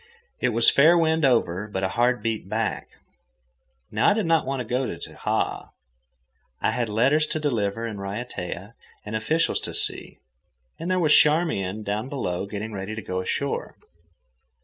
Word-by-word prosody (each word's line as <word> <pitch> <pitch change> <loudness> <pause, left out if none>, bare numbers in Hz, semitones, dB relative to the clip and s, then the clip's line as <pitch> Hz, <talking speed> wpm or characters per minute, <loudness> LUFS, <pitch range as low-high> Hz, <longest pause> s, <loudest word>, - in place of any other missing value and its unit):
It 125 - +1
was 115 0 +6
fair 160 +5 +6
wind 160 -1 +2
over, 105 -7 +2
but 95 -2 -4
a 95 - +1
head 120 +4 +1
beat 115 -2 -2
back. - - -2 1.0
Now 110 - +3
I - - +4
did 220 - 0
not 165 -4 +2
want 135 0 -2
to - - -2
go 125 +3 -1
to - - -4
Tahaa. - - -3 0.9
I - - +1
had 120 -1 -1
letters 135 +9 +3
to 155 - -2
deliver 115 -6 -1
in 110 -3 -5
Raiatea, 100 -1 -6 0.3
and 105 +1 -5
officials 155 +10 +1
to - - -5
see, - - 0 0.6
and 165 +2 -4
there 185 - +2
was 160 -4 +4
Charmian 110 - +2
down 105 +5 -3
below 100 -9 -3
getting 105 +2 -5
ready 100 +2 -5
to 115 - -5
go 90 0 -3
ashore. 95 - -3
115 Hz, 170 wpm, -24 LUFS, 105-150 Hz, 1.0 s, was